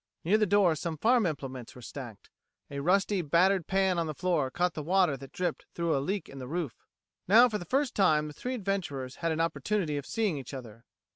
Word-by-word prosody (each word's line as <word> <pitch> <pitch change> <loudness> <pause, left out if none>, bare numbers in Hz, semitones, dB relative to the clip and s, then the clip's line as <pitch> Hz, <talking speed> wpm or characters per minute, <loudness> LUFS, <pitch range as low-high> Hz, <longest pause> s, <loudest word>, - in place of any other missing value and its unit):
Near 205 +6 +3
the 215 - +3
door 195 -3 +4
some 160 +1 -4
farm 230 - +3
implements 130 -6 -6
were 125 - -11
stacked. 115 -6 -9 0.4
A 140 - -4
rusty, 195 +5 +2
battered 175 +3 +3
pan 190 -2 +2
on 165 - -1
the 155 - -4
floor 170 -6 0
caught 175 +5 0
the 155 - -4
water 180 -1 +2
that 135 0 -11
dripped 180 -3 -2
in - - -28
through 170 -2 +1
a 135 - +1
leak 195 +7 -2
in 135 - -10
the 130 - -6
roof. 155 -6 -4 0.4
Now, 230 +6 +8
for 215 -3 -3
the 175 - -7
first 270 +2 0
time, 155 -6 +3
the 150 - -7
three 250 - -4
adventurers 175 - -3
had 165 -1 -1
an 160 - -2
opportunity 165 -1 0
of 140 - -5
seeing 210 -10 0
each 135 +1 -8
other. 115 -3 -10
170 Hz, 225 wpm, -29 LUFS, 140-195 Hz, 0.4 s, Now